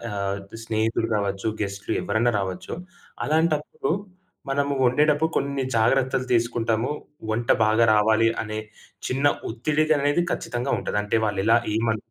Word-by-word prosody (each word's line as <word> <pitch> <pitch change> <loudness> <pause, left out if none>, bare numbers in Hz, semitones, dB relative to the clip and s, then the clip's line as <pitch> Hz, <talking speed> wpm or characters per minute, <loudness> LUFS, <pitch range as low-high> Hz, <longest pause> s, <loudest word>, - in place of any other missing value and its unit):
ఆహ్, 100 0 -2 0.3
స్నేహితులు 115 +1 0
కావచ్చు, 100 0 -2
గెస్ట్‌లు 100 -1 -3
ఎవ్వరైనా 120 +2 +1
రావచ్చు. 95 -2 -5 0.5
అలాంటప్పుడు 155 -2 0 0.6
మనము 140 +1 0
వండేటప్పుడు 150 +5 +3
కొన్ని 140 -1 -1
జాగ్రత్తలు 130 +3 +2
తీసుకుంటాము. 115 0 +1 0.4
వంట 115 +2 -2 0.2
బాగా 110 +2 +4
రావాలి 110 +2 +4 0.2
అనే 110 0 -4 0.5
చిన్న 135 +3 -1 0.2
ఒత్తిడి 145 +7 0
అనేది 145 +2 +3
ఖచ్చితంగా 135 -6 -2
ఉంటది. - - -3
అంటే 105 - -1
వాళ్ళు 105 -3 0
ఎలా 115 +1 +6 0.2
ఏమ 110 -1 +1
115 Hz, 125 wpm, -24 LUFS, 110-140 Hz, 0.6 s, ఎలా